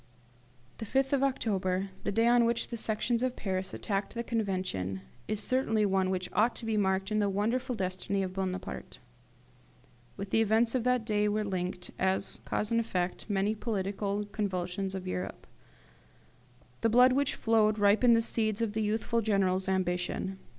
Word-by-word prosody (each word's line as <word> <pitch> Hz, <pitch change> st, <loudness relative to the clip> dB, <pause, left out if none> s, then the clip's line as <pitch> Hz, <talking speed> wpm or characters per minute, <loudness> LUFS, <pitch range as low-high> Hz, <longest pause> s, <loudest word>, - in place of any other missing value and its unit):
The 225 Hz, -, -4 dB
5th 270 Hz, +4 st, +1 dB
of 275 Hz, -, +3 dB
October, 195 Hz, -8 st, 0 dB
the -, -, -1 dB
day 225 Hz, +3 st, +2 dB
on 240 Hz, 0 st, +5 dB
which 235 Hz, 0 st, 0 dB
the 235 Hz, -, -4 dB
Sections 230 Hz, +2 st, -1 dB
of 255 Hz, 0 st, 0 dB
Paris 190 Hz, -2 st, -3 dB
attacked 200 Hz, +1 st, -3 dB
the 235 Hz, -, -2 dB
Convention, 185 Hz, -, -2 dB, 0.3 s
is 215 Hz, -1 st, -1 dB
certainly 225 Hz, -5 st, +2 dB
one 190 Hz, -1 st, +1 dB
which 185 Hz, -1 st, -1 dB
ought 230 Hz, +3 st, +3 dB
to 230 Hz, -, -6 dB
be 225 Hz, -1 st, 0 dB
marked 195 Hz, -1 st, +1 dB
in 215 Hz, -, +2 dB
the 205 Hz, -1 st, +2 dB
wonderful 230 Hz, +6 st, 0 dB
destiny 195 Hz, 0 st, -1 dB
of 185 Hz, -1 st, -4 dB
Bonaparte. 185 Hz, -, -4 dB, 1.2 s
With 200 Hz, 0 st, -6 dB
the 225 Hz, -, +4 dB
events 225 Hz, +2 st, +3 dB
of 255 Hz, -3 st, 0 dB
that 250 Hz, -2 st, +2 dB
day 210 Hz, -1 st, +1 dB
were 210 Hz, +1 st, 0 dB
linked, 180 Hz, -2 st, -3 dB
as 190 Hz, +1 st, 0 dB
cause 210 Hz, -, -2 dB
and 230 Hz, -, +3 dB
effect, 185 Hz, -4 st, -2 dB
many 205 Hz, +1 st, +1 dB
great 215 Hz, -, -13 dB
political 205 Hz, -1 st, -2 dB
convulsions 190 Hz, -1 st, -2 dB
of 190 Hz, -1 st, -5 dB
Europe. 180 Hz, 0 st, -4 dB, 1.4 s
The 230 Hz, -, +3 dB
blood 250 Hz, +3 st, +6 dB
which 280 Hz, +1 st, +1 dB
flowed 220 Hz, -1 st, +3 dB
ripened 215 Hz, +4 st, +5 dB
the 230 Hz, -, +2 dB
seeds 220 Hz, -2 st, -1 dB
of 225 Hz, -3 st, -1 dB
the 220 Hz, -, -1 dB
youthful 220 Hz, +2 st, 0 dB
General's 190 Hz, -3 st, +1 dB
ambition. 185 Hz, +1 st, -1 dB
205 Hz, 170 wpm, -30 LUFS, 190-230 Hz, 1.4 s, blood